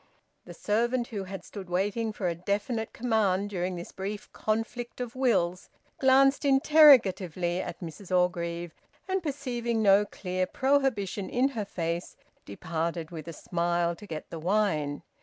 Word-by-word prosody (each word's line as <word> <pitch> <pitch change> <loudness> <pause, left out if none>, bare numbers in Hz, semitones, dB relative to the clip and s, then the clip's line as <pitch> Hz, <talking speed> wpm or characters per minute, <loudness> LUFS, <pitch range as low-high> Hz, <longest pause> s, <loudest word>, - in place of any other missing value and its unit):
The - - -10
servant, 235 +3 0
who 200 -4 -4
had 190 -1 -7
stood 195 -3 -9
waiting 205 +5 0
for 200 -3 -3
a 170 - 0
definite 205 +6 -2
command 205 -4 0
during 180 -1 -2
this 170 0 -7
brief 200 +2 -6
conflict 225 +3 -3
of 245 -1 -5
wills, 190 -9 +1 0.3
glanced 270 +1 +5
interrogatively 230 - +5
at - - -7
Mrs 175 +3 -8
Orgreave 175 -2 0 0.3
and, 380 0 0
perceiving 245 -7 -2
no 200 0 +6
clear 185 -2 -3
prohibition 260 -8 0
in 255 +3 +2
her 225 -6 -4
face, 170 -2 -3 0.3
departed 165 - -3
with 160 -2 -8
a - - -4
smile 170 +1 -1
to 210 - -12
get 155 -4 -7
the 165 - -5
wine. 160 -6 0
200 Hz, 145 wpm, -28 LUFS, 175-235 Hz, 0.3 s, no